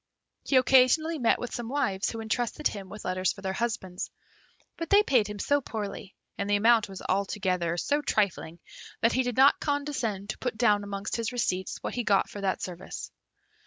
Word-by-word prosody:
He 275 - 0
occasionally 265 +5 +4
met 235 - +3
with 245 - -6
some 235 -1 -4
wives 210 -9 0
who 225 - -5
entrusted 240 +6 -1
him 195 -3 -7
with 210 - -9
letters 185 0 +1
for 195 - -13
their 190 0 -1
husbands, 190 -5 -3 0.7
but 330 -1 -5
they 405 +1 +6
paid 245 - +3
him 210 0 -6
so 285 +7 +1
poorly, 205 -5 -6 0.2
and 200 - -2
the 205 - +4
amount 220 0 +4
was 190 -2 -8
altogether 185 -3 0
so 290 - 0
trifling, 190 - -1 0.4
that 230 +1 +3
he 260 - +3
did 245 -2 -3
not 275 +2 +6
condescend 265 -9 -2
to - - -10
put 250 -4 -3
down 210 -3 +3
amongst 200 +1 -4
his 230 -2 -2
receipts 190 -7 -1
what - - -3
he 245 - -2
got 200 -3 +2
for 205 - -7
that 195 -1 -1
service. 180 +1 -7
215 Hz, 195 wpm, -28 LUFS, 195-250 Hz, 0.7 s, they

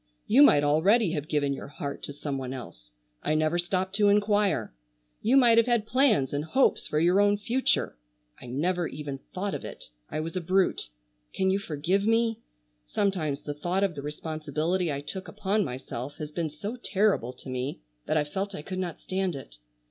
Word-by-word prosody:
You 255 +6 +5
might 145 - +7
already 175 +8 +4
have 150 -3 -3
given 145 -2 +1
your - - -7
heart 140 0 -6
to - - -6
some 145 -1 -4
one 130 0 -4
else; - - -10 0.3
I 155 - 0
never 155 +2 +2
stopped 185 +2 -1
to 205 -1 +4
inquire. 205 - +2 0.5
You 245 +5 +4
might 235 -3 +7
have 230 - +3
had 235 -3 +2
plans 225 - +3
and 145 +1 -1
hopes 260 - +2
for 150 - 0
your 175 +5 +4
own 205 0 +4
future; 235 - 0 0.4
I - - -9
never 170 +7 0
even 145 -2 -6
thought 195 +2 -3
of - - -4
it. - - -9 0.2
I - - -3
was 165 +3 -4
a 185 - -1
brute. 185 - +1 0.5
Can 190 0 +2
you 195 - +1
forgive 175 +2 0
me? 225 0 +2 0.5
Sometimes 160 - 0
the 145 - -4
thought 175 +6 -1
of 195 -3 +1
the 145 - -6
responsibility 155 +3 -2
I 140 0 -3
took 190 +6 -7
upon 210 0 0
myself 130 0 -6
has 150 -1 -6
been 165 0 -2
so 200 +11 -6
terrible 205 - +1
to 130 - -14
me 130 - -3 0.3
that 155 - +2
I 150 - +3
felt 190 +6 -4
I 150 - -7
could 185 +3 -5
not 175 -3 -4
stand 190 -3 -1
it. - - -10
175 Hz, 195 wpm, -28 LUFS, 145-200 Hz, 0.5 s, might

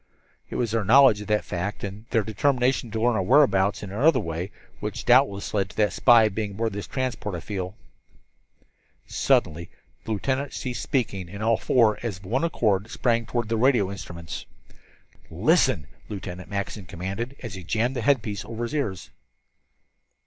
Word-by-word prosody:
"It - - -6
was 115 -3 0
their 115 -1 +1
knowledge 115 0 +6
of 105 - -8
that 105 -1 +1
fact, 90 +4 -4
and 100 +3 -6
their 115 - +2
determination 125 +3 +1
to 110 +1 -3
learn 120 +2 +3
our 95 - +1
whereabouts 100 -5 +3
in 100 - -7
another 130 +7 +3
way, 85 -1 -4 0.3
which - - -5
doubtless 120 -5 +3
led 100 -2 0
to - - -15
that 105 -4 +2
spy 115 -2 +6
being 105 0 -3
aboard 110 +1 -2
this 100 0 -5
transport. 130 -7 -3
I - - -4
feel 95 0 -5 0.7
" - - -51 0.5
Suddenly 85 +2 +1 0.3
the 110 - -2
lieutenant 130 +6 -2
ceased 125 -2 -4
speaking, 100 - -2
and 100 +3 -6
all 115 +1 +4
four, 110 -2 +3
as 115 -6 -3
of 95 - -16
one 125 - 0
accord, 110 - +1
sprang 115 -1 0
toward 120 -1 -2
the 115 0 0
radio 120 -5 +3
instruments. 85 -5 -7 0.8
"Listen!" 75 - +2 0.2
Lieutenant 90 -3 -7
Mackinson 100 -1 -4
commanded, 95 - -5
as 115 -5 -6
he 95 -2 -7
jammed 115 +9 0
the 125 - -2
headpiece 110 -7 +1
over 115 0 -5
his 120 - -4
ears. 105 - -3
110 Hz, 175 wpm, -25 LUFS, 95-120 Hz, 0.8 s, knowledge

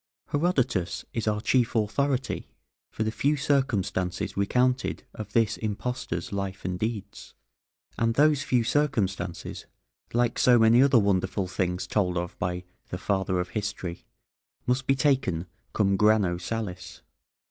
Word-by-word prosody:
Herodotus 135 - 0
is 115 -2 -2
our 105 0 +1
chief 120 0 +2
authority 130 +5 0 0.4
for 110 - -3
the 110 - -1
few 145 +6 +1
circumstances 110 - 0
recounted 125 +6 +1
of 105 -1 -8
this 115 -2 +2
impostor's 110 -4 -3
life 100 -1 -4
and 90 -1 -2
deeds, 105 -2 -5 0.6
and 115 0 +2
those 150 0 +4
few 125 -4 +2
circumstances, 105 - -1 0.4
like 120 0 +1
so 125 -1 +6
many 115 +2 +6
other 135 -2 +5
wonderful 100 -2 +1
things 90 -1 -1
told 90 -4 0
of 85 0 -3
by 90 0 -2 0.3
the 90 - -4
"Father 95 -1 0
of 90 - -2
History," 100 -5 -4 0.6
must 125 +2 0
be 135 - +4
taken 130 - +1 0.3
cum 100 -2 +1
granô 105 -5 +3
salis. 95 -2 -5
110 Hz, 135 wpm, -27 LUFS, 95-125 Hz, 0.6 s, so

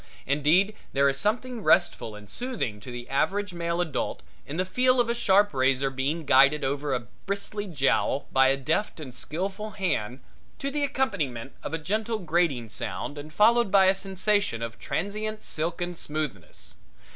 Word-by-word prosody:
Indeed 155 +9 +3 0.2
there 140 0 +4
is 135 0 -1
something 235 +3 -1
restful 170 - +2
and 105 0 -12
soothing 215 - -3
to 125 +5 -9
the 120 0 -7
average 200 +8 0
male 170 0 -2
adult 170 -4 -2 0.2
in 145 - -5
the 185 - +1
feel 255 +6 +3
of 235 -1 +2
a - - +2
sharp 205 -4 +3
razor 135 +1 +2
being 140 +5 -2
guided 140 +2 +5
over 140 0 -1
a 125 - -2 0.3
bristly 200 +1 -3
jowl 140 -3 +1
by 135 0 +5
a 135 +1 +3
deft 160 +8 -1
and 135 -5 -8
skillful 195 - -4
hand, 130 - -1 0.4
to 275 - -3
the 295 0 -1
accompaniment 170 - -1
of - - -3
a - - -1
gentle 215 +8 -1
grating 165 - 0
sound 145 +6 -5
and 150 +2 -9
followed 230 +5 +4
by 195 -1 +6
a 190 - +6
sensation 195 - 0
of 115 0 -6
transient 215 +3 -3
silken 175 +2 -3
smoothness. 150 - -5
170 Hz, 170 wpm, -27 LUFS, 135-205 Hz, 0.4 s, by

